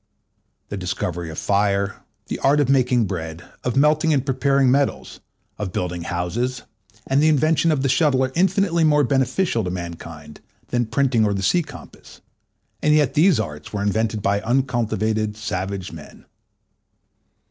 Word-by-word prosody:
The 100 Hz, -, -4 dB
discovery 90 Hz, -2 st, -3 dB
of 80 Hz, -, -8 dB
fire, 100 Hz, 0 st, 0 dB, 0.2 s
the -, -, -5 dB
art 140 Hz, +2 st, +3 dB
of 140 Hz, -3 st, +2 dB
making 125 Hz, -3 st, +3 dB
bread, 80 Hz, -3 st, -5 dB, 0.2 s
of 125 Hz, -, -2 dB
melting 155 Hz, +3 st, +3 dB
and 140 Hz, -3 st, +1 dB
preparing 135 Hz, 0 st, +2 dB
metals, 140 Hz, +1 st, -1 dB, 0.4 s
of 100 Hz, -3 st, -3 dB
building 90 Hz, -1 st, -3 dB
houses, 100 Hz, +10 st, -3 dB, 0.4 s
and 135 Hz, +2 st, +2 dB
the 155 Hz, -, +4 dB
invention 155 Hz, +2 st, +3 dB
of 140 Hz, -3 st, 0 dB
the -, -, +2 dB
shuttle, 135 Hz, -1 st, +2 dB
are 130 Hz, -, -1 dB
infinitely 185 Hz, 0 st, +2 dB
more 150 Hz, -2 st, +4 dB
beneficial 135 Hz, -, +1 dB
to 90 Hz, -, -3 dB
mankind 85 Hz, -4 st, -8 dB, 0.3 s
than 120 Hz, -2 st, 0 dB
printing 125 Hz, -2 st, +2 dB
or 105 Hz, -1 st, +1 dB
the 95 Hz, -, -3 dB
sea 175 Hz, -, +3 dB
compass: -, -, -13 dB, 0.6 s
and 150 Hz, 0 st, +3 dB
yet 150 Hz, -3 st, +2 dB
these 160 Hz, -, +4 dB
arts 75 Hz, -6 st, -6 dB
were 100 Hz, -1 st, -2 dB
invented 110 Hz, +1 st, -1 dB
by 100 Hz, 0 st, +1 dB
uncultivated, 110 Hz, -3 st, 0 dB
savage 95 Hz, -3 st, -4 dB
men. 80 Hz, -2 st, -12 dB
120 Hz, 155 wpm, -22 LUFS, 95-140 Hz, 0.6 s, the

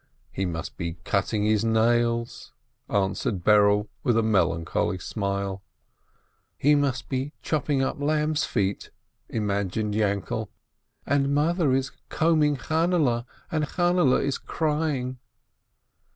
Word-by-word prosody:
"He 95 Hz, 0 st, -2 dB
must 80 Hz, -2 st, -5 dB
be 85 Hz, -2 st, -3 dB
cutting 105 Hz, +5 st, 0 dB
his 110 Hz, 0 st, +2 dB
nails/' 115 Hz, +1 st, +1 dB, 0.4 s
answered 95 Hz, -1 st, -1 dB
Berele, 105 Hz, 0 st, +4 dB
with 120 Hz, -5 st, +2 dB
a 115 Hz, -, +3 dB
melancholy 90 Hz, -3 st, +1 dB
smile. 100 Hz, 0 st, -3 dB, 1.0 s
"He 145 Hz, +2 st, +4 dB
must 140 Hz, -3 st, 0 dB
be 135 Hz, +2 st, -3 dB
chopping 145 Hz, -3 st, 0 dB
up 135 Hz, -, -2 dB
lambs' 150 Hz, +1 st, +1 dB
feet," 100 Hz, -3 st, -1 dB, 0.4 s
imagined 105 Hz, -1 st, -1 dB
Yainkele, 105 Hz, +1 st, -1 dB, 0.6 s
"and 140 Hz, 0 st, +1 dB
Mother 160 Hz, 0 st, +2 dB
is 135 Hz, 0 st, -1 dB, 0.2 s
combing 155 Hz, -3 st, +2 dB
Chainele, 155 Hz, -5 st, +1 dB, 0.2 s
and 155 Hz, -1 st, 0 dB
Chainele 175 Hz, -5 st, +2 dB
is 140 Hz, -1 st, -1 dB
crying." 150 Hz, -5 st, -1 dB
120 Hz, 110 wpm, -26 LUFS, 100-145 Hz, 1.0 s, Berele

